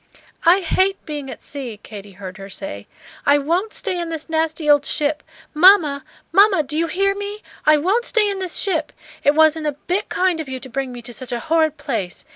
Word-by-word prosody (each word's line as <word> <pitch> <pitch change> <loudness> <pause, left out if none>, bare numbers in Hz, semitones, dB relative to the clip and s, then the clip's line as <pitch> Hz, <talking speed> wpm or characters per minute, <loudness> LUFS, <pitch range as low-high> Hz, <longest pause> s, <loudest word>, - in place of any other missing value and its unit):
"I 365 +3 +6
hate 380 +3 +1
being 295 -3 -5
at - - -9
sea," 255 -7 -7
Katy 205 -2 -10
heard 190 0 -9
her 195 0 -9
say. 140 - -7 0.4
"I 285 +1 +5
won't 345 +9 -1
stay 385 -6 -2
in 340 -1 -3
this 320 -2 -5
nasty 320 -1 -1
old 290 -1 +5
ship. 300 +1 0 0.3
Mamma! 310 -4 +5 0.3
Mamma! 390 -2 +5
do 295 +2 -6
you 330 +2 +1
hear 390 +4 +1
me? 405 +1 -6 0.2
I 305 0 +7
won't 395 +11 +1
stay 440 -3 +2
in 400 -1 -2
this 370 -2 -3
ship! 390 - -1 0.3
It 285 - +4
wasn't 315 0 +4
a 295 - 0
bit 360 +7 -3
kind 365 -3 +1
of 295 - -8
you 260 0 -4
to 260 - -11
bring 265 +1 -3
me 240 -1 -9
to 240 +1 -6
such 250 +2 -7
a 240 - -2
horrid 315 +1 +1
place. 235 - -4
310 Hz, 215 wpm, -20 LUFS, 270-370 Hz, 0.4 s, I